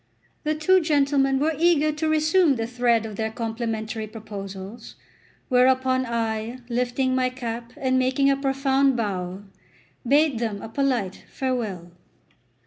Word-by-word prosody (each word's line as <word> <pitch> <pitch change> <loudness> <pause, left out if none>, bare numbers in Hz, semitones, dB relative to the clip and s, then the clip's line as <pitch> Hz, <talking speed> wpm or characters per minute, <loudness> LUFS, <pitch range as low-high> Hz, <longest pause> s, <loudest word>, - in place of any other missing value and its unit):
The 305 0 0
two 370 +5 +4
gentlemen 280 -3 +2
were 305 +4 +1
eager 320 -3 +4
to 310 +1 -2
resume 310 0 +3
the 225 -2 -2
thread 240 -1 +1
of 215 -2 -7
their 220 0 -1
complimentary 225 -1 -4
proposals, 200 -1 -8 0.5
whereupon 260 0 +3
I, 225 0 -2
lifting 250 +2 0
my 255 0 +2
cap 235 -2 -6
and 260 -1 +1
making 260 +2 +2
a 275 - +4
profound 270 -1 +1
bow, 190 -3 -3 0.6
bade 285 -2 +3
them 220 -4 -2
a - - -7
polite 245 -8 -1
farewell. 220 -10 -3
255 Hz, 135 wpm, -24 LUFS, 225-275 Hz, 0.6 s, two